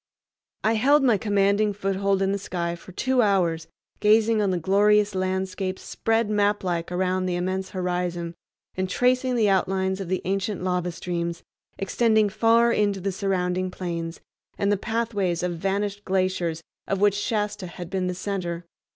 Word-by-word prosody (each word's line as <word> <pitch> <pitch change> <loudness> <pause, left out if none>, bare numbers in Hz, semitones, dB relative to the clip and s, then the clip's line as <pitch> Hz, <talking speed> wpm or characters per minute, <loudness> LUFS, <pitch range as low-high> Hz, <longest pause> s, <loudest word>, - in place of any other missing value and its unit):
I 220 - +3
held 275 +6 +4
my 235 -6 +4
commanding 205 0 +2
foothold 195 0 0
in 195 - +1
the 200 - -1
sky 170 -3 -3
for 175 - -13
two 260 +6 +1
hours, 180 -6 +1 0.3
gazing 220 +1 +4
on 200 - +2
the 185 - +1
glorious 205 +4 +3
landscapes 185 0 -2
spread 225 0 0
maplike 205 -5 0
around 185 +1 0
the 180 - -1
immense 185 +2 -2
horizon, 180 -2 -2 0.4
and 185 0 -2
tracing 255 +3 +2
the 220 -3 +3
outlines 190 0 +1
of 190 - -5
the 185 -1 -1
ancient 195 0 -1
lava 180 -1 0
streams 170 0 -4 0.3
extending 220 +1 +2
far 230 +3 +4
into 205 -3 +1
the 195 +1 -2
surrounding 185 -1 -1
plains, 170 -2 -5 0.4
and 200 0 +1
the - - +4
pathways 205 -5 -1
of 175 -1 -2
vanished 200 +2 -1
glaciers 185 -3 -1 0.2
of 195 - -1
which 205 0 +4
Shasta 205 -1 -2
had 175 0 -9
been 190 -1 -1
the 180 - -2
center. 175 -3 -4
195 Hz, 160 wpm, -25 LUFS, 180-210 Hz, 0.4 s, held